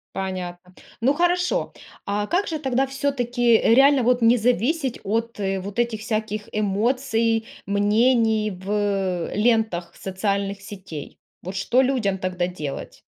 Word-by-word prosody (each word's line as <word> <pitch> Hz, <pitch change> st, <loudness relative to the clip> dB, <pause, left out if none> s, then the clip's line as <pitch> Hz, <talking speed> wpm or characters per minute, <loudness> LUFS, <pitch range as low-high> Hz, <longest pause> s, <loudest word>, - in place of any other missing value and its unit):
Понятно. 180 Hz, -1 st, -5 dB, 0.3 s
Ну 260 Hz, +5 st, +3 dB
хорошо, 355 Hz, +8 st, +1 dB, 0.3 s
а 205 Hz, +1 st, -1 dB
как 375 Hz, -, 0 dB
же 315 Hz, -2 st, -3 dB
тогда 265 Hz, -2 st, +1 dB
всё-таки 245 Hz, -4 st, +1 dB
реально 270 Hz, +3 st, +5 dB
вот 250 Hz, +1 st, +2 dB
не 230 Hz, +2 st, +5 dB
зависеть 250 Hz, -, 0 dB
от 225 Hz, +2 st, -2 dB
вот 195 Hz, +2 st, -3 dB
этих 235 Hz, -3 st, 0 dB
всяких 215 Hz, -1 st, -3 dB
эмоций, 225 Hz, +2 st, 0 dB, 0.2 s
мнений 215 Hz, +2 st, +2 dB
в, 190 Hz, +1 st, -9 dB
э, 195 Hz, -4 st, -1 dB
лентах 215 Hz, -6 st, +1 dB
социальных 195 Hz, +1 st, -2 dB
сетей. 190 Hz, -7 st, -9 dB, 0.2 s
Вот 185 Hz, +2 st, -7 dB
что 215 Hz, +7 st, +2 dB
людям 250 Hz, -7 st, +1 dB
тогда 185 Hz, -1 st, -2 dB
делать? 155 Hz, -6 st, -6 dB
220 Hz, 130 wpm, -23 LUFS, 195-245 Hz, 0.3 s, реально